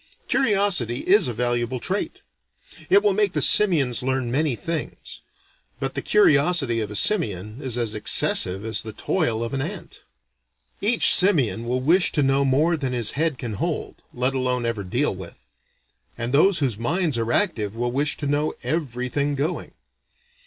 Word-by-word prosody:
Curiosity 200 - +1
is 200 -5 +4
a 120 - -3
valuable 120 +1 -1
trait. 190 +10 -4 0.7
It 200 +1 +4
will 205 -2 +3
make 205 -1 0
the - - -1
simians 150 - +3
learn 130 -1 -2
many 145 0 0
things. 165 +3 -6 0.6
But 135 -1 -3
the - - -4
curiosity 150 - +2
of 105 -2 -4
a 105 - -7
simian 105 - -1
is 130 -4 -2
as 115 -3 -1
excessive 100 -2 +2
as 110 - 0
the 110 -1 -8
toil 115 - -1
of 115 - -5
an 135 - -2
ant. 170 +9 -8 0.8
Each 230 +4 +4
simian 130 - +3
will 125 +1 -1
wish 175 +7 +3
to 145 - +1
know 135 +1 +2
more 145 +6 +2
than 135 -4 -3
his 120 -4 +1
head 155 -1 -1
can 120 -3 -6
hold, - - -4
let 125 +2 -1
alone 125 -2 -1
ever 115 -3 -3
deal 120 +9 -1
with; 95 -2 -12 0.7
and 120 +2 -4
those 175 +6 +4
whose 125 -8 -1
minds 160 +4 -1
are 115 0 -2
active 115 - 0
will 120 +1 -2
wish 145 +3 0
to 145 - -6
know 145 +2 -1
everything 140 -1 -2
going. 150 +6 -4
135 Hz, 165 wpm, -22 LUFS, 120-165 Hz, 0.8 s, is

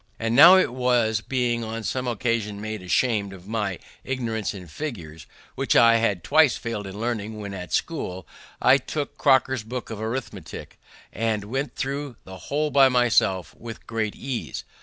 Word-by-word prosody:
And 115 +1 -1
now 175 +8 +10
it 185 -10 +2
was 125 -3 +2
that, 110 - -9
being 120 -3 0
on 115 0 -5
some 130 +3 -2
occasion 115 -3 -1
made 110 -1 -5
asham'd 100 +2 0
of 95 0 -13
my 105 -4 -2 0.3
ignorance 115 -5 -2
in 95 -3 -9
figures, 80 - -7 0.3
which - - 0
I 115 -1 +7
had 100 -6 0
twice 150 +1 +4
failed 110 -4 -5
in 95 +2 -8
learning 110 -2 -3
when 100 -1 -6
at 90 -3 -7
school, 90 -2 -3 0.3
I 130 - +6
took 145 +1 -5
Cocker's 130 -3 +3
book 120 +2 -6
of 110 - -6
Arithmetick, 110 -6 -6 0.3
and 110 -1 -1
went 135 +7 -3
through 140 -1 -3
the 95 0 -10
whole 150 +1 0
by 135 -1 +6
myself 110 - +2
with 115 -1 -10
great 110 -2 -2
ease. 130 -3 -5
115 Hz, 170 wpm, -24 LUFS, 105-130 Hz, 0.3 s, now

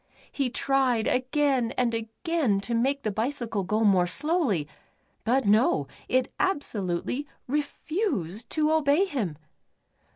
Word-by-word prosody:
He 275 -3 -1
tried 255 -3 +1
again 255 -1 +1
and 245 -2 +1
again 230 - -1
to 200 +4 -3
make 270 +4 +1
the 215 - 0
bicycle 225 -1 -2
go 210 +4 0
more 190 -4 +4
slowly, 280 - +1 0.6
but 255 +4 +2
no, 205 - +3 0.2
it 255 -1 +1
absolutely 265 - -1 0.2
refused 285 - -2
to 310 0 +1
obey 315 +3 +3
him. 220 - -3
250 Hz, 120 wpm, -27 LUFS, 215-290 Hz, 0.6 s, more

